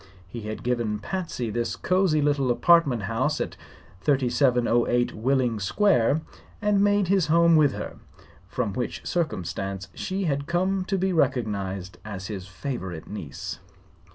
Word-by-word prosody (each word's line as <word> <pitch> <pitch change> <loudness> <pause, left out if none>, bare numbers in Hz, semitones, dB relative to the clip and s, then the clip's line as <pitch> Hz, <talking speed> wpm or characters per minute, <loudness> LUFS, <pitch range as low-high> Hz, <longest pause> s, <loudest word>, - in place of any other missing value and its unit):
He 115 +5 -7
had 110 - -6
given 120 -4 0
Patsy 125 - -4
this 115 0 -1
cosy 180 0 +2
little 140 -3 +2
apartment 140 -3 +4
house 130 +8 0
at - - -3 0.4
3708 120 -1 +2
Willing 125 -1 +1
Square 150 - +2 0.4
and 210 -2 +2
made 205 -2 +3
his 190 -3 +2
home 170 +1 +5
with 150 -3 +4
her, - - -6 0.5
from 105 0 -2
which 120 +3 -4
circumstance 95 - -2
she 195 +1 -3
had 140 -4 -1
come 185 +2 0
to 195 +1 0
be 190 0 0
recognized 100 - -1
as 100 -3 -6
his 95 -3 -6
favorite 95 - -5
niece. 80 -9 -6
125 Hz, 135 wpm, -25 LUFS, 105-170 Hz, 0.5 s, home